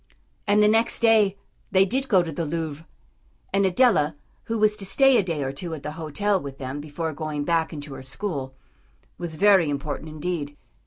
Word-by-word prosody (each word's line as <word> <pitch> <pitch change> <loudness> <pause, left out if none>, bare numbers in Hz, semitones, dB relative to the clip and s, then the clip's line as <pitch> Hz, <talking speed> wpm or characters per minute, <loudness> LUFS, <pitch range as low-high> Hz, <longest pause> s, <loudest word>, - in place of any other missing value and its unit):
And 205 +1 +4
the - - +6
next 225 +2 +3
day 215 -4 +4 0.3
they 190 -1 +4
did 265 +7 -1
go 190 -7 +4
to 165 - -5
the 165 +2 -3
Louvre. 160 0 -4 0.7
And 195 0 +3
Adela, 180 - +3 0.3
who 230 - -2
was 210 0 +3
to 205 - -7
stay 270 +5 +4
a - - +4
day 165 -6 -3
or 135 - -2
two 165 +3 -5
at 150 - -11
the 150 - -4
hotel 165 +6 -1
with 140 -1 -8
them 135 +2 -5
before 155 +2 -4
going 150 -1 -3
back 165 +1 +1
into 145 -3 -7
her 135 - -8
school, 135 -1 -5 0.6
was 170 -2 -4
very 190 -3 +5
important, 145 +2 -4
indeed. 155 -2 -4
165 Hz, 195 wpm, -24 LUFS, 145-200 Hz, 0.7 s, the